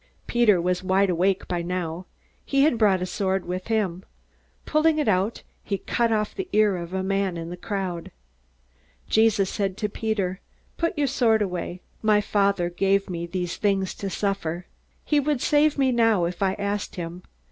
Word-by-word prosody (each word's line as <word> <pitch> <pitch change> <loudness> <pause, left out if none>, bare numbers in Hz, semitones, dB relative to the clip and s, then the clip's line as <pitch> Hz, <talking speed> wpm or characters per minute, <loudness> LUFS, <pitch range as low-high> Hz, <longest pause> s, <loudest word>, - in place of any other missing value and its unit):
Peter 230 -6 +4
was 180 +1 0
wide 190 +1 +2
awake 185 +3 +1
by 175 -1 -1
now. 175 0 -4 0.4
He 275 0 +2
had 265 -6 +3
brought 195 -4 +3
a - - 0
sword 190 +1 -1
with 180 +1 -4
him. 195 -5 -1 0.6
Pulling 310 0 +3
it 300 - 0
out, 200 +2 +1 0.2
he 200 - -2
cut 235 +3 0
off 215 -1 0
the 380 -2 -5
ear 210 -2 +4
of 170 -1 -6
a 190 0 -2
man 195 -2 0
in 165 0 -6
the - - -4
crowd. 180 -2 -4 1.0
Jesus 215 -3 +3
said 195 -2 -2
to 210 - -1
Peter: 200 -4 -2 0.4
"Put 335 +1 -1
your 290 - +2
sword 230 -5 +2
away. 180 -1 -4 0.2
My 215 -1 +4
Father 200 -3 +1
gave 195 +2 +1
me 170 -1 -4
these 175 -1 -3
things 195 -2 0
to 200 - -3
suffer. 185 -3 -2 0.4
He 295 - +3
would 290 -1 0
save 295 +3 +3
me 265 -2 +3
now 225 -7 +3
if 175 +2 -5
I 190 -1 +2
asked 200 0 -3
him. 175 0 -6
195 Hz, 180 wpm, -25 LUFS, 180-220 Hz, 1.0 s, Peter